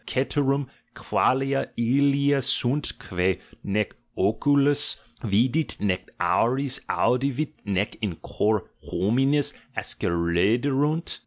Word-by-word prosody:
Ceterum 140 +1 0 0.3
qualia 135 +1 +1
ilia 140 +3 +2
sunt, 130 +3 +2
quce 90 0 -1 0.2
nee 105 +1 0 0.3
oculus 140 +8 +3 0.2
vidit 120 +9 +2
nee 95 -3 0 0.2
auris 130 +3 +1
audivit 135 +4 0
nee 100 0 0
in 100 -6 -2
cor 105 +4 -1 0.2
hominis 135 +8 +1 0.2
ascenderunt?" 120 - 0
130 Hz, 85 wpm, -25 LUFS, 105-140 Hz, 0.3 s, oculus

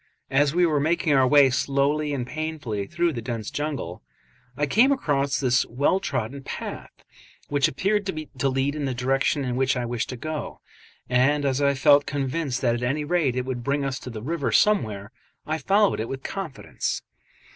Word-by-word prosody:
As 140 +1 +3
we 175 0 +4
were 155 -3 +2
making 160 +1 +1
our 135 -2 +5
way 140 -1 +6
slowly 140 +3 +1
and 130 -4 -2
painfully 150 -9 -4
through 170 0 0
the 120 - -4
dense 115 -2 -4
jungle, 140 - -4 0.6
I 145 - +1
came 225 - +4
across 140 - 0
this 125 -3 +3
well 140 +10 +1
trodden 130 - -3
path, - - -7 0.5
which 145 -1 +3
appeared 200 +7 0
to 155 -6 -2
lead 135 +2 0
in 150 -1 -3
the 130 -2 -2
direction 135 +3 +1
in 125 -1 -2
which 130 0 +1
I 125 - -1
wished 120 -1 -3
to 125 - -5
go, 155 +3 -5 0.5
and 135 +4 +2
as 135 0 +1
I 140 0 +3
felt 145 +1 +5
convinced 140 -1 -2
that 120 -3 +2
at 120 - -3
any 135 +5 0
rate 150 -5 +1
it 125 0 -1
would 125 -2 -4
bring 140 +2 0
us 135 -1 -2
to - - -8
the 110 -3 -7
river 155 +1 -1
somewhere, 110 - +2 0.3
I 155 +1 -2
followed 200 +3 +2
it 110 - -3
with 135 0 -5
confidence. 185 -8 -4
140 Hz, 190 wpm, -25 LUFS, 125-155 Hz, 0.6 s, way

